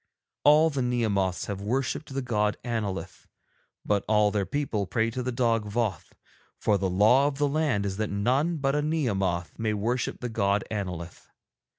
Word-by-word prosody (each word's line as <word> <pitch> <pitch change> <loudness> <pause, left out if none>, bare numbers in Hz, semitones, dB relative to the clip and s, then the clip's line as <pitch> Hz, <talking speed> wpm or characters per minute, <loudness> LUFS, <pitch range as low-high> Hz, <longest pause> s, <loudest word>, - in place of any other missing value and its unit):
All 155 +3 +6
the 140 -2 -1
Nehemoths 110 -7 0
have 100 -1 -5
worshipped 130 +7 -2
the 135 0 -2
god 105 -3 0
Annolith, 100 -7 -4 0.6
but 100 -1 +1
all 105 -1 +3
their 100 -3 -1
people 110 -5 -2
pray 115 +2 0
to 125 - -3
the 125 +1 -2
dog 115 -3 +1
Voth, 110 -3 -2 0.4
for 105 -2 +1
the 95 0 0
law 110 +9 +4
of 140 -2 -3
the 145 0 +2
land 145 -9 0
is 95 -1 -3
that 110 -1 -1
none 130 +12 +1
but 135 -1 0
a 150 - +1
Nehemoth 100 - -1
may 110 -1 0
worship 115 +4 -1
the 125 - -3
god 100 -3 +1
Annolith. 90 -5 -5
110 Hz, 175 wpm, -27 LUFS, 100-130 Hz, 0.6 s, All